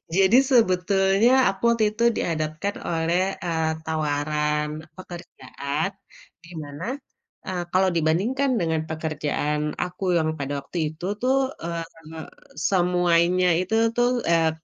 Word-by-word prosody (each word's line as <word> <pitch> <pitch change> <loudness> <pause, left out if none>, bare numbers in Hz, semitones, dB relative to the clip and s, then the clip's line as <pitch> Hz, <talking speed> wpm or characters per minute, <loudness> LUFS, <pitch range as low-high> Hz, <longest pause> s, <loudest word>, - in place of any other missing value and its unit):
Jadi 195 +5 +5
sebetulnya 195 0 +3 0.2
aku 195 - -5
waktu 230 -1 0
itu 235 +2 -1
dihadapkan 155 +4 -2
oleh, 170 +2 +1 0.2
eee, 160 -2 0 0.2
tawaran 150 -1 -1 0.3
pekerjaan, 170 -3 -5 0.6
dimana, 160 -1 -7 0.6
eee, 180 -2 -2
kalau 190 +1 +4
dibandingkan 215 - +1
dengan 160 -1 0
pekerjaan 150 -1 -2 0.2
aku 180 +2 -5
yang 160 -1 +1
pada 140 0 -3
waktu 155 +5 -8 0.2
itu 165 +3 -8 0.2
tuh, 260 +2 +2 0.3
eee, 170 0 -3 0.9
semuanya 180 -1 +3
itu 185 +5 -1 0.2
tuh 245 0 +3 0.2
eee, 165 -1 +4
170 Hz, 110 wpm, -24 LUFS, 155-190 Hz, 0.9 s, Jadi